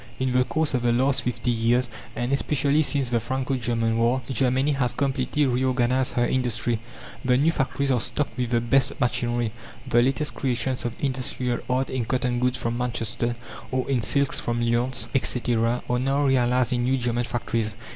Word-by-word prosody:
In 130 -1 -1
the 125 0 +4
course 155 +3 -1
of 125 - +1
the 120 0 +2
last 130 +3 +2
fifty 120 0 -1
years, 120 +2 +2 0.3
and 120 +3 -1
especially 145 +1 +2
since 140 -4 0
the 120 - +2
Franco 130 +3 -2
German 115 -2 0
war, 120 +3 +2
Germany 130 +3 +2
has 130 -4 0
completely 135 +2 0
reorganized 130 0 +1
her 120 - +2
industry. 120 -2 0 0.4
The 125 -1 +3
new 150 +5 +3
factories 140 -2 0
are 125 - +2
stocked 140 +2 -2
with 125 -1 -2
the 120 -1 +2
best 135 +3 +1
machinery; 120 -2 0 0.4
the 120 -2 +4
latest 135 +4 0
creations 130 -1 -1
of 120 - -2
industrial 130 -2 -1
art 130 +1 0
in 130 -3 -1
cotton 125 0 0
goods 125 0 +1
from 120 0 -2
Manchester, 120 -1 -2 0.3
or 130 -1 -1
in 135 -3 +1
silks 140 +4 +1
from 120 0 -2
Lyons, 120 +2 0
etc., 120 -2 +1
are 125 0 +1
now 135 +3 +1
realized 125 -1 +2
in 120 -1 0
new 130 +2 +2
German 120 -1 0
factories. 115 -3 -2
125 Hz, 180 wpm, -25 LUFS, 120-130 Hz, 0.4 s, the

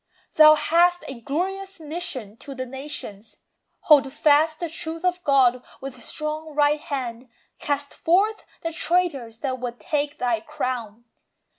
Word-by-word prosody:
Thou 310 0 +9
hast 350 +3 +3
a 255 -3 -8
glorious 385 +8 -3
mission 300 - -6
to 275 +2 -9
the 255 0 -4
nations. 250 -6 -7 0.4
Hold 285 -3 +5
fast 305 +2 +3
the 345 - -2
truth 325 +1 -5
of 360 0 0
God 255 -3 +4 0.2
with 260 -3 -8
strong 305 +2 -4
right 295 0 +3
hand, 250 -4 -5 0.3
Cast 285 -1 -2
forth 405 +6 +2 0.2
the 330 0 -3
traitors 290 -11 0
that 260 -2 -2
would 245 -1 -5
"take 290 -1 -2
thy 240 -3 0
crown." 240 -5 -4
290 Hz, 140 wpm, -24 LUFS, 255-325 Hz, 0.4 s, Thou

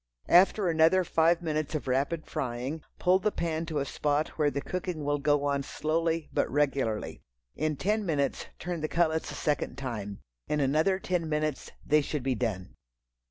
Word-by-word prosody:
After 190 +3 +5
another 165 +3 +4
five 170 +1 +2
minutes 155 -1 -2
of 150 - -3
rapid 140 +5 0
frying, 130 +5 -3 0.2
pull 185 +1 +3
the 210 - +1
pan 165 -2 -2
to 155 -2 -3
a 140 - 0
spot 145 +2 0
where 150 -2 +1
the 140 - -3
cooking 180 0 -4
will 145 0 +1
go 145 0 +2
on 140 -1 +1
slowly, 160 +3 -1
but - - +1
regularly. 135 -6 0 0.3
In 155 0 -1
ten 210 +8 0
minutes 145 -7 -1
turn 175 -2 -4
the 155 - 0
cutlets 160 -1 +1
a - - -6
second 145 -4 -1
time. 110 -7 -5 0.3
In 150 - 0
another 155 +7 +2
ten 180 -4 -2
minutes 150 -2 -1 0.2
they 150 +1 +4
should 145 -1 -3
be 135 0 +1
done. 105 -6 -3
155 Hz, 175 wpm, -29 LUFS, 140-165 Hz, 0.3 s, After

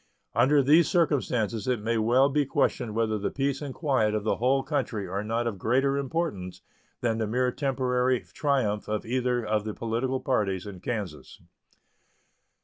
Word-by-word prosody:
Under 135 +5 +4
these 155 +5 +5
circumstances 125 - 0
it 125 -3 +1
may 115 +2 0
well 120 +5 +4
be 145 +1 +1
questioned 135 -6 0
whether 110 -2 0
the 100 - -1
peace 140 0 -1
and 145 -2 -4
quiet 130 -8 +1
of 105 - -1
the 110 - 0
whole 135 +3 +2
country 130 -9 -2
are 100 +3 -3
not 115 +2 -1
of 110 -5 -3
greater 135 +7 +2
importance 140 - -3 0.4
than 115 -1 0
the 110 - 0
mere 125 +3 +1
temporary 130 -2 0
triumph 130 -8 0
of 105 -1 -2
either 125 0 0
of 105 0 0
the 110 -1 -5
political 120 +3 -1
parties 105 -8 -1
in 100 -3 -8
Kansas. 100 -8 -5
120 Hz, 165 wpm, -27 LUFS, 110-135 Hz, 0.4 s, these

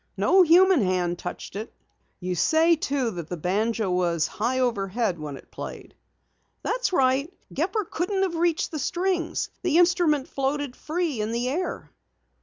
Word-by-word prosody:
No 380 - +5
human 360 -1 +6
hand 180 -2 0
touched - - -7
it." 215 +3 -5 0.5
"You 180 0 -2
say, 320 - +4
too, 275 -5 -1
that 170 -5 -7
the 180 - -4
banjo 210 +4 0
was 170 -3 +1
high 240 +9 -1
overhead 210 -5 0
when 145 -2 -6
it - - -17
played?" - - -8 0.7
"That's - - 0
right, 270 -1 +2
Dad. - - -23
Gepper 430 -3 -1
couldn't 380 +4 -1
have 365 -3 -1
reached 335 -1 +1
the 310 - -4
strings. 350 +3 -1
The 340 -3 +2
instrument 345 -6 +3
floated 275 -1 -2
free 315 -7 -2
in 215 +1 -2
the 240 +2 -1
air." 285 - -3
265 Hz, 160 wpm, -25 LUFS, -, 0.7 s, human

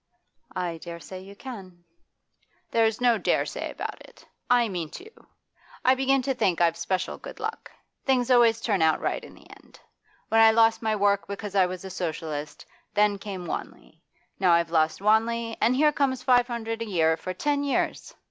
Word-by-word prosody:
'I 175 -3 -3
dare 170 0 -8
say 185 +2 -9
you 195 +2 -12
can.' 190 -8 -10 0.9
'There's 225 -1 +2
no 245 -2 +3
"dare - - +1
say" - - -5
about - - -6
it. - - -17 0.2
I 245 -1 +4
mean 175 -6 -4
to! 415 +5 -13 0.7
I 255 - +6
begin 270 0 +2
to 270 - 0
think 205 -8 0
I've 170 -1 +3
special 185 +2 -2
good - - -10
luck; - - -5 0.3
things 260 -2 +1
always 235 -2 +5
turn 200 -6 0
out 160 -1 +3
right - - -2
in - - -12
the - - -18
end. - - -17 0.5
When 225 0 +4
I 225 - +8
lost 225 0 +4
my 220 -1 0
work 200 -1 +1
because 200 0 -6
I 190 -2 +4
was 185 +1 -7
a 190 - -7
Socialist, 155 -4 -5 0.3
then 205 -1 +3
came 195 -3 -6
Wanley. - - -7 0.4
Now 185 -3 +4
I've 170 -1 +2
lost 160 +1 +1
Wanley, 225 +2 +2
and 240 +3 +3
here 300 +3 +4
comes 265 -3 0
five 245 -2 +4
hundred 225 -2 -4
a - - -2
year 165 -6 +2
for 185 +2 -6
ten 285 +7 0
years! 280 - -2
210 Hz, 185 wpm, -26 LUFS, 180-240 Hz, 0.9 s, I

